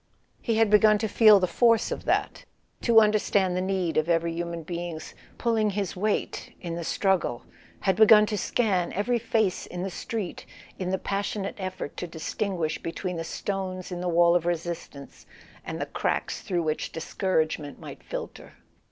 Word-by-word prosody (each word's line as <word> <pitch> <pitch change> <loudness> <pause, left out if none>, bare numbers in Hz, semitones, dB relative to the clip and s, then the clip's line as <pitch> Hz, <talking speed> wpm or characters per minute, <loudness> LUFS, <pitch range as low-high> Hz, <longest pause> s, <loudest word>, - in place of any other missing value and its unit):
He 230 - 0
had 220 -1 +3
begun 215 0 +6
to 220 +1 -1
feel 215 -1 +7
the 185 - +2
force 230 +5 +3
of - - -4
that, - - 0 0.4
to 230 -2 +6
understand 205 -3 +2
the 180 - 0
need 185 -3 -1
of 155 +2 +1
every 165 0 +1
human 170 0 -4
being's 170 -1 -6 0.2
"pulling 225 -3 +1
his 200 -2 -3
weight" 205 +3 -2
in 170 -2 -5
the 170 0 -4
struggle, 180 -9 0 0.4
had 190 -2 +1
begun 215 -1 +8
to 210 - -2
scan 195 -3 0
every 235 +5 0
face 220 -4 0
in 180 0 -5
the 190 - -3
street 215 0 -5 0.3
in 185 -1 -2
the 190 - 0
passionate 200 +1 -3
effort 185 -6 -5
to 175 - -4
distinguish 165 0 -3
between 175 +2 -4
the 165 - -3
stones 185 +1 -4
in 175 0 -4
the 180 - -1
wall 170 0 +4
of 175 -1 +1
resistance 170 -4 -5 0.4
and - - -5
the - - -1
cracks - - -2
through 175 -3 -1
which 155 -1 -2
discouragement 160 -4 -2
might - - -10
filter. - - -7
185 Hz, 170 wpm, -26 LUFS, 170-210 Hz, 0.4 s, begun